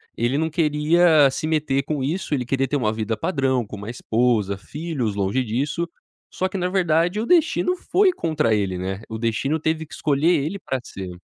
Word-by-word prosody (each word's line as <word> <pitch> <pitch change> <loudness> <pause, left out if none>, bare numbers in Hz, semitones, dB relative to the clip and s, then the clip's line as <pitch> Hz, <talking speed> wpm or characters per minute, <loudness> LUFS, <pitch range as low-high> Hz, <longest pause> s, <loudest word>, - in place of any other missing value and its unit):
ele 120 +4 0
não 160 +1 0
queria 155 -1 +4
se 135 - -4
meter 150 -4 0
com 150 0 -3
isso, 165 +4 -2
ele 130 -3 0
queria 135 +2 0
ter 145 - 0
uma 110 -5 0
vida 110 0 -2
padrão, 130 - 0
com 105 - -8
uma 105 +2 -7
esposa, 115 -4 0
filhos, 130 - -4
longe 100 +6 0
disso, 140 +9 -2 0.5
só 185 - 0
que, 195 - -4
na 180 -1 0
verdade, 175 0 +1
o - - -2
destino 355 +3 +3
foi 380 +2 +3
contra 155 - 0
ele, 95 -3 -1
né, 95 +2 -4
o 110 - -4
destino 115 +7 -1
teve 160 +1 -1
que 150 - -15
escolher 150 +3 +2
ele 195 +6 -3
pra 130 -8 -3
ser. 95 -5 -7
140 Hz, 195 wpm, -22 LUFS, 115-160 Hz, 0.5 s, queria